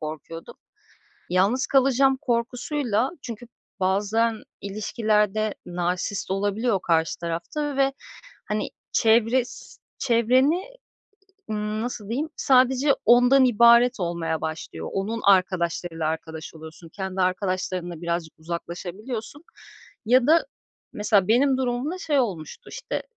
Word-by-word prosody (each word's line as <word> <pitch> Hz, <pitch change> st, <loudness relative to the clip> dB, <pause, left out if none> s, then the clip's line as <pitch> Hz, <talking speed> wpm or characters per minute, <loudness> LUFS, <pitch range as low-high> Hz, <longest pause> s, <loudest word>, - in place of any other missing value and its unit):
korkuyordum. 160 Hz, -, -8 dB, 0.8 s
Yalnız 195 Hz, +8 st, +2 dB
kalacağım 270 Hz, 0 st, +3 dB
korkusuyla 245 Hz, 0 st, -1 dB
çünkü 235 Hz, -1 st, -8 dB, 0.3 s
bazen 210 Hz, +4 st, +1 dB, 0.2 s
ilişkilerde 215 Hz, +1 st, 0 dB
narsist 180 Hz, +3 st, -2 dB
olabiliyor 205 Hz, +2 st, 0 dB
karşı 165 Hz, -2 st, +1 dB
tarafta 175 Hz, -, -3 dB
ve, 275 Hz, 0 st, +2 dB, 0.6 s
hani, 210 Hz, 0 st, -1 dB, 0.2 s
çevres 230 Hz, +2 st, +1 dB, 0.2 s
çevreni, 250 Hz, +5 st, +3 dB
eee, -, -, -11 dB, 0.7 s
ımm, 210 Hz, +1 st, -2 dB
nasıl 235 Hz, -4 st, -5 dB
diyeyim? 275 Hz, +8 st, -2 dB
Sadece 265 Hz, +2 st, +3 dB
ondan 245 Hz, +3 st, +6 dB
ibaret 235 Hz, 0 st, +5 dB
olmaya 170 Hz, -2 st, -2 dB
başlıyor. 160 Hz, 0 st, -5 dB
Onun 215 Hz, +4 st, -2 dB
arkadaşlarıyla 175 Hz, -4 st, +1 dB
arkadaş 160 Hz, 0 st, -6 dB
oluyorsun, 160 Hz, +1 st, -12 dB
kendi 190 Hz, +2 st, -5 dB
arkadaşlarınla 185 Hz, -2 st, -2 dB
birazcık 170 Hz, -2 st, -2 dB
uzaklaşabiliyorsun 185 Hz, -, -6 dB, 0.6 s
ya 250 Hz, +2 st, +4 dB
da 330 Hz, +8 st, +4 dB, 0.5 s
mesela, 210 Hz, -2 st, +2 dB
benim 260 Hz, +4 st, +4 dB
durumumda 260 Hz, +7 st, -2 dB
şey 295 Hz, -6 st, +1 dB
olmuştu: 190 Hz, -, -5 dB
İşte, -, -, -4 dB
215 Hz, 105 wpm, -24 LUFS, 180-250 Hz, 0.8 s, ondan